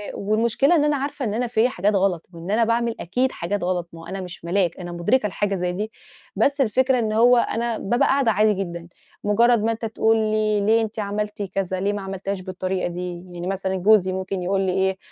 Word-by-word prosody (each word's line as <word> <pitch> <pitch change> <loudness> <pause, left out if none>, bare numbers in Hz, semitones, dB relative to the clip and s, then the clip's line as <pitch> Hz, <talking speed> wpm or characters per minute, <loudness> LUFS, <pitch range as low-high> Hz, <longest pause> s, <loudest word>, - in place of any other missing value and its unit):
والمُشكلة 230 - +2
إن 295 - +3
أنا 295 0 +2
عارفة 275 0 -3
إن 210 - -2
أنا 245 +2 -1
فيّا 230 +1 +2
حاجات 205 -2 0
غلط، 185 -4 +1
وإن 170 +3 -6
أنا 225 +2 +3
باعمل 230 0 0
أكيد 250 +9 0
حاجات 190 +3 -3
غلط، 175 -1 -1
ما 165 - -10
هو - - -11
أنا 195 0 -5
مش 175 -2 -9
ملاك 175 -1 0
أنا 175 -1 -6
مُدركة 210 +7 +1
لحاجة 200 +1 -1
زي 180 -1 -1
دي، 210 +4 -4 0.4
بس 280 0 +2
الفكرة 255 +2 +2
إن 215 -2 -1
هو 240 +3 +5
أنا 235 -1 0
بابقى 240 +5 +1
قاعدة 270 -4 +3
عادي 215 0 +3
جدًا 170 -3 -5 0.4
مُجرّد 230 +2 +3
ما 225 - +2
أنت 225 0 -4
تقول 225 0 +2
لي 215 -1 +1
ليه 225 +2 +3
أنتِ 220 0 -4
عملتِ 210 +1 -3
كذا، 190 -1 -3
ليه 200 +2 0
ما 205 - -4
عملتيهاش 195 0 -4
بالطريقة 185 0 -3
دي، 175 0 -5
يعني 175 0 -6
مثلًا 190 0 -2
جوزي 190 0 +4
ممكن 190 0 -3
يقول 195 +2 0
لي 190 -1 0
إيه، 190 0 +1
205 Hz, 220 wpm, -23 LUFS, 185-225 Hz, 0.4 s, هو